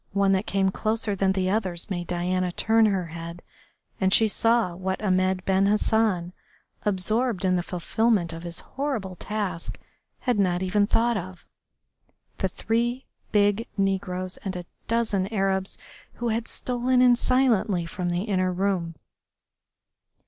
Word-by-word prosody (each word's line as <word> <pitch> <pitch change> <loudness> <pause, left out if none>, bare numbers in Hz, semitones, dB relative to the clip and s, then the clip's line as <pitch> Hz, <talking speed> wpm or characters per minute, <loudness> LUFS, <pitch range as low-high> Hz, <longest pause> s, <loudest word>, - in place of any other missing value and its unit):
One 200 0 +3
that 190 +2 +1
came 190 0 +1
closer 215 0 -1
than 190 0 +2
the 185 -1 0
others 185 -5 -1
made 175 -2 -3
Diana 180 +1 -1
turn 220 +4 +3
her 190 -3 0
head 170 +1 -8 0.6
and 190 -1 +2
she 220 +2 +6
saw 225 -3 +2
what 190 +2 -3
Ahmed 185 -2 +1
Ben 195 +1 +3
Hassan, 210 -4 +1 0.5
absorbed 210 +1 0
in 185 -1 +3
the 175 - +1
fulfilment 180 +1 0
of 165 - -7
his 170 0 -4
horrible 255 -10 -3
task, 195 -3 -4 0.4
had 245 -5 +1
not 180 -2 +1
even 205 +2 +2
thought 235 +1 +2
of 185 -1 -7 0.9
the - - +1
three 240 +3 -1 0.3
big 205 +3 +2
negroes 185 -2 -1
and 195 -2 -5
a 180 -1 -5 0.2
dozen 220 -5 +1
Arabs 195 -2 0 0.4
who 240 -1 -3
had 225 +1 -1
stolen 250 0 0
in 250 -1 +6
silently 235 -8 +2
from 175 +1 -3
the 175 +2 -1
inner 185 -4 0
room. 180 -3 -1
195 Hz, 145 wpm, -25 LUFS, 185-220 Hz, 0.9 s, she